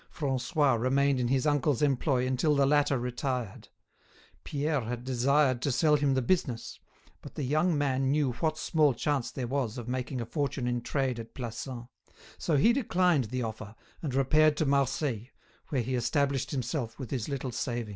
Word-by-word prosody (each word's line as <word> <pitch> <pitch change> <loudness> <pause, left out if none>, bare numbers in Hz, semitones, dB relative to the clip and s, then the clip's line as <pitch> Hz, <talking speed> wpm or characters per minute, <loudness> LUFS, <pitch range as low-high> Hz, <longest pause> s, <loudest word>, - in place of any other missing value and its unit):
Francois 135 -1 0
remained 135 +3 +2
in 120 - 0
his 130 0 +1
uncle's 145 -2 +1
employ 135 -2 +1
until 130 +4 +1
the 140 -1 +4
latter 145 -1 +3
retired. 125 -2 -3 0.8
Pierre 145 0 -1
had 120 +1 -5
desired 130 +1 +2
to 140 - 0
sell 150 +4 +3
him 140 -2 +2
the 130 - +1
business, 125 -7 -1 0.4
but - - -11
the 145 - -3
young 155 +5 +1
man 135 -2 +1
knew 145 -2 +2
what 155 +5 -1
small 150 -4 +2
chance 140 0 -1
there 130 - -4
was 130 -2 -2
of 120 -1 -6
making 130 +1 -3
a 115 - -3
fortune 140 0 -2
in 120 0 -1
trade 125 0 -1
at 115 0 -9
Plassans; 120 0 -6 0.5
so 155 - +1
he 225 +12 +5
declined 180 - +2
the 125 +3 -3
offer 110 -1 -6 0.3
and 140 -6 -3
repaired 150 +3 +4
to 155 - +1
Marseilles, 135 -4 0 0.4
where 135 -6 0
he 130 +3 -3
established 135 +2 0
himself 125 -3 -3
with 130 -5 -7
his 125 -3 -2
little 135 -2 -3
savings. 120 -2 -3
135 Hz, 175 wpm, -29 LUFS, 125-145 Hz, 0.8 s, he